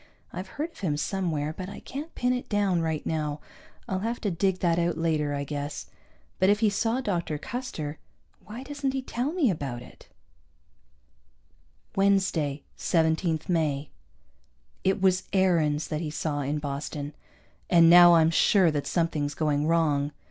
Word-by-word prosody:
I've - - -5
heard 315 +3 -2
of - - -17
him 155 -7 -1
somewhere, 155 -3 -2
but 185 0 -6
I - - -8
can't 295 +4 -7
pin 250 0 +1
it 250 - -4
down 200 -5 +1
right 160 -2 -2
now. 150 -2 -2 0.5
I'll 190 - -1
have 230 +4 -2
to 205 - -1
dig 185 +2 +1
that 170 -1 +2
out 170 -1 0
later, 155 -3 0
I 140 - -2
guess. 145 0 -5 0.5
But 185 - +4
if 205 0 +3
he 215 -2 +4
saw 225 +5 0
Dr. 170 - -2
Custer, 160 - -5 0.4
why 230 +5 -8
doesn't 280 -1 -3
he 265 -1 -2
tell 255 +3 -2
me 320 - +2
about 135 -7 -4
it? - - -16 1.9
Wednesday, 190 -8 +1
17 160 -1 +1
May. 150 -5 0 0.9
It 190 +2 +2
was 185 -1 +2
Aarons 165 -6 +2
that 155 0 -2
he 160 - -3
saw 150 -1 -2
in 145 +2 -1
Boston, 145 0 -4 0.6
and 170 -2 +6
now 175 0 +9
I'm 165 0 +4
sure 180 0 +4
that 145 -2 -2
something's 155 -4 -1
going 150 -1 0
wrong. 150 -3 +1
165 Hz, 160 wpm, -27 LUFS, 150-195 Hz, 1.9 s, now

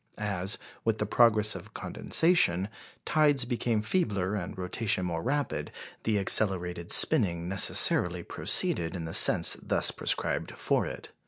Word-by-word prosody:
As, 100 -1 -2 0.3
with 115 -1 -2
the 105 - -3
progress 105 -1 +1
of - - -12
condensation, 110 - 0 0.4
tides 145 -4 0
became 120 -3 -3
feebler 105 - -3
and 95 -4 -7
rotation 95 +1 -3
more 85 -2 -5
rapid, 145 - -4 0.3
the 110 -2 -1
accelerated 90 -4 0
spinning 90 - +3
necessarily 90 -2 +4
proceeded 85 +1 +1
in 85 -2 -7
the 80 - -8
sense - - +6
thus - - +1
prescribed - - -4
for - - -3
it. - - -11
105 Hz, 135 wpm, -26 LUFS, 90-115 Hz, 0.4 s, sense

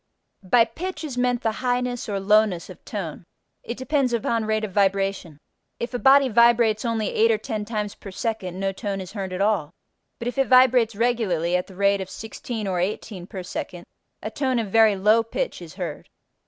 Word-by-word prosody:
By 230 +5 +4
pitch 345 +11 -6
is 290 -5 -5
meant 250 0 0
the 225 - +2
highness 245 -2 -1
or 200 -1 -1
lowness 200 -3 +2
of 185 - -14
tone. 180 -6 -5 0.4
It 235 - -6
depends 260 -1 0
upon 230 -1 0
rate 215 0 0
of 215 - -3
vibration. 195 -4 0 0.4
If 235 +2 -4
a 245 - -2
body 275 +1 +6
vibrates 235 -2 +4
only 230 -3 -1
8 225 +1 +4
or - - +1
10 215 -3 -4
times 210 -2 -3
per 200 - -11
second 190 -3 -4
no 195 0 0
tone 195 0 -4
is 185 -1 -7
heard 195 -3 -4
at 185 +1 -3
all: 200 -8 +1 0.5
but 235 - -5
if 245 +3 -3
it 270 - +3
vibrates 255 -3 +5
regularly 200 -7 +1
at 180 - -1
the 190 - -13
rate 200 +1 +2
of 190 - -6
16 220 0 -6
or 185 -2 -1
18 185 0 -4
per 190 -2 -7
second 175 0 -6 0.4
a 215 - -4
tone 260 +1 0
of 220 -4 -2
very 220 -1 +5
low 210 +4 +4
pitch 360 - -4
is - - -10
heard. - - -6
215 Hz, 200 wpm, -24 LUFS, 195-240 Hz, 0.5 s, body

